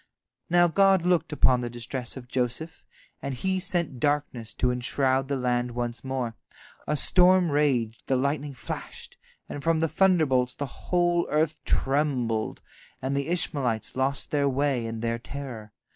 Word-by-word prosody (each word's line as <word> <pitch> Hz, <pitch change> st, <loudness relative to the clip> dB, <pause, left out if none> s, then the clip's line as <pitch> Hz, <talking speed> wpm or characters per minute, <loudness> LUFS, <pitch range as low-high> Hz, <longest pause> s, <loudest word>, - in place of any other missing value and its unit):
Now 175 Hz, 0 st, +5 dB
God 195 Hz, 0 st, +4 dB
looked 180 Hz, -2 st, +2 dB
upon 130 Hz, -4 st, +3 dB
the 120 Hz, -, -3 dB
distress 120 Hz, +2 st, -4 dB
of 125 Hz, -1 st, -9 dB
Joseph, 125 Hz, +6 st, -3 dB, 0.4 s
and 140 Hz, -1 st, -3 dB
He 190 Hz, +9 st, 0 dB
sent 175 Hz, -8 st, -2 dB
darkness 145 Hz, -6 st, -1 dB
to 125 Hz, -, +1 dB
enshroud 130 Hz, +2 st, +1 dB
the 140 Hz, -, -1 dB
land 125 Hz, -1 st, -1 dB
once 120 Hz, -1 st, -3 dB
more. 130 Hz, -3 st, -2 dB, 0.5 s
A 150 Hz, -, 0 dB
storm 180 Hz, +2 st, +4 dB
raged, 130 Hz, -7 st, 0 dB
the 135 Hz, -, +2 dB
lightning 140 Hz, +1 st, -1 dB
flashed, -, -, -8 dB, 0.3 s
and 145 Hz, -, -6 dB
from 165 Hz, +1 st, +2 dB
the 165 Hz, -, +2 dB
thunderbolts 155 Hz, -9 st, +2 dB
the 145 Hz, -, -3 dB, 0.2 s
whole 175 Hz, -1 st, +2 dB
earth 155 Hz, +1 st, 0 dB
trembled, 130 Hz, -6 st, 0 dB, 0.4 s
and 135 Hz, +1 st, -2 dB
the 140 Hz, +1 st, -1 dB
Ishmaelites 130 Hz, -, 0 dB
lost 135 Hz, +2 st, -1 dB
their 145 Hz, -1 st, +2 dB
way 135 Hz, -3 st, 0 dB
in 115 Hz, -1 st, -5 dB
their 115 Hz, 0 st, -1 dB
terror. 120 Hz, -5 st, -8 dB
135 Hz, 155 wpm, -26 LUFS, 125-155 Hz, 0.5 s, Now